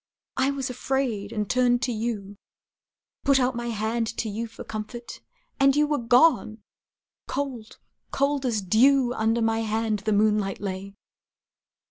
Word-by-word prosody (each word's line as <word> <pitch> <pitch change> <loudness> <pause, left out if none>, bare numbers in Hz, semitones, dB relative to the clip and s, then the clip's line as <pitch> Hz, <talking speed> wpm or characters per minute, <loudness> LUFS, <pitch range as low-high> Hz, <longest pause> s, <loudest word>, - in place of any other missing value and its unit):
I 265 +1 +2
was 270 -2 -3
afraid, 245 -5 -2
and 210 -2 -2
turned 245 +1 +2
to 250 - 0
you, 215 -3 -4 0.9
Put 275 -1 +4
out 255 -1 +1
my 240 0 -4
hand 225 +1 -1
to 225 - -2
you 225 +3 -4
for 225 - -10
comfort, 230 +3 -7 0.4
And 275 0 +5
you 300 0 +4
were 295 0 0
gone! 240 -3 +3 0.6
Cold, 260 -6 -4 0.3
cold 280 0 0
as 225 -6 0
dew, 245 +6 +4
Under 225 0 +1
my 225 0 +1
hand 220 -1 -1
the 215 +2 -2
moonlight 210 -1 +2
lay! 195 0 -5
230 Hz, 145 wpm, -25 LUFS, 215-260 Hz, 0.9 s, And